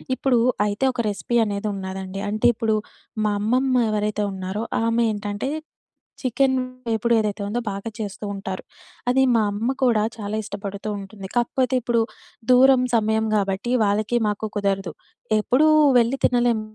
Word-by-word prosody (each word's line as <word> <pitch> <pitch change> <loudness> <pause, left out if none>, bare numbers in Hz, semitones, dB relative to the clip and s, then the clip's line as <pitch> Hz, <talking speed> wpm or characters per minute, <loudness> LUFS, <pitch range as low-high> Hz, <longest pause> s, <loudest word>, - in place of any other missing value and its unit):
ఇప్పుడు 255 -3 +2 0.3
అయితే 205 +6 -1
ఒక 235 - -1
రెసిపీ 220 +4 -1
అనేదున్నా‌దండి, 195 -2 -4
అంటే 215 +2 +2
ఇప్పుడు, 220 -1 +1 0.5
మా 210 - +2
అమ్మమ్మ 255 +4 +1 0.2
ఎవరైతే 210 0 0
ఉన్నారో, 190 +3 -4 0.2
ఆమేంటంటే 220 0 -1 0.7
చికెన్ 265 +1 +1 0.3
వేపుడేదైతే 220 -2 +1
ఉందో, 240 +3 -1
బాగా 200 +3 -5
చేస్తూ 205 0 -5
ఉంటారు. 190 -1 -5 0.5
అది 260 +2 +4
మా 225 - +4
అమ్మ 210 +4 -2
కూడా 230 -4 +3
చాలా 210 -1 -4
ఇష్టపడుతూ 200 0 -6
ఉంటుంది. 195 0 -9
కాకపోతే 255 +2 +1
ఇప్పుడు, 235 0 +1 0.5
దూరం, 255 +1 +6
సమయం 220 0 +2
గాబట్టి 200 +3 0
వాళ్ళకీ, 210 +3 +1
మాకు 210 +1 -2
కుదరదు. 195 -2 -1 0.5
ఎప్పుడూ 255 +8 +3 0.3
వెళ్ళి 235 +3 +2
తినలేం 240 -2 +3
215 Hz, 130 wpm, -23 LUFS, 200-240 Hz, 0.7 s, దూరం